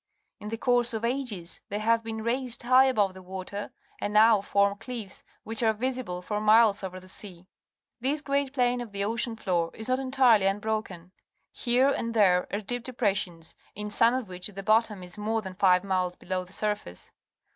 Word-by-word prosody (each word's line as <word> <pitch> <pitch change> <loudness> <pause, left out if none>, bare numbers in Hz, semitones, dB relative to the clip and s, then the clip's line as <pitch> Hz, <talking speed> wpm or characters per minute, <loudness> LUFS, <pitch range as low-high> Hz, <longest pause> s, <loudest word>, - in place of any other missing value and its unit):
In 210 - -7
the 225 - -3
course 245 -1 +1
of 220 +1 -2
ages 235 -9 -2
thej^ 205 - -2
have 230 +1 +2
been 220 -1 -5
raised 245 +1 -2
high 255 +2 +6
above 210 -8 +2
the 190 - -11
water, 190 +2 -6 0.3
and 205 - -2
now 215 0 +6
form 200 0 +1
cliffs, 225 -4 -7 0.2
which 225 +1 -3
are 220 -2 +3
visible 235 -6 -3
for 210 +2 -2
miles 215 -1 +5
over 185 -1 -5
the 185 - -16
sea. 185 -2 -6 0.5
This 280 +5 -1
great 280 -1 0
pla 260 -3 +1
in 245 0 +1
of 230 -4 -8
the 200 0 -1
ocean 230 +2 -1
floo 180 -6 0
r 165 - -11
is 220 +2 -5
not 255 +1 +2
entirely', 255 -6 +4
^unbrokm. 195 -3 -3 0.6
Uno 255 +3 +4
and 230 0 -3
there 185 -4 +4
are 205 - -2
deep 245 +3 -4
d - - -5
epression.', 195 -8 -1 0.2
in 210 +1 -5
^olne 230 +4 +3
of 255 -5 -5
which 180 -1 -4
the 195 -1 -8
bottom 215 -2 +2
is 180 +3 -8
more 220 +1 -1
than 190 -1 -7
fi\e 185 -1 +4
miles 185 -2 0
below 185 0 -4
the 180 - -19
surface 210 - -4
215 Hz, 200 wpm, -27 LUFS, 190-240 Hz, 0.6 s, high